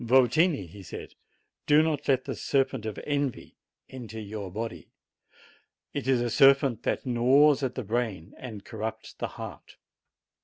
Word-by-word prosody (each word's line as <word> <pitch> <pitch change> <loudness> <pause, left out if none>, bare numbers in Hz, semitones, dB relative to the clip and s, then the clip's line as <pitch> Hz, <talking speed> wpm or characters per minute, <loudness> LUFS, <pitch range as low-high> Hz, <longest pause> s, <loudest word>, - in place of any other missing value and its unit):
"Y 130 +2 +6
tini," 150 - +2
he 95 +4 -12 0.8
"do 150 +1 +6
not 150 -2 -1
let 130 -2 +2
the - - -3
serpent 135 -4 0
of 105 - -5
envy 145 -4 -2 0.3
enter 115 -4 -9
FXVY - - -4
ITT 100 - -10
your 105 -3 -5
body; 105 -6 -5 1.0
it - - -3
is 130 -2 +3
a 120 - 0
serpent 135 -2 +5
which - - -1
g 130 - -5
naws 135 +4 +5
at 130 -2 -2
the 130 - -3
brain 110 -6 -2
and 110 -6 -8
corrupts 110 0 -5
the - - -4
heart." - - -9
120 Hz, 165 wpm, -28 LUFS, 110-135 Hz, 1.0 s, Y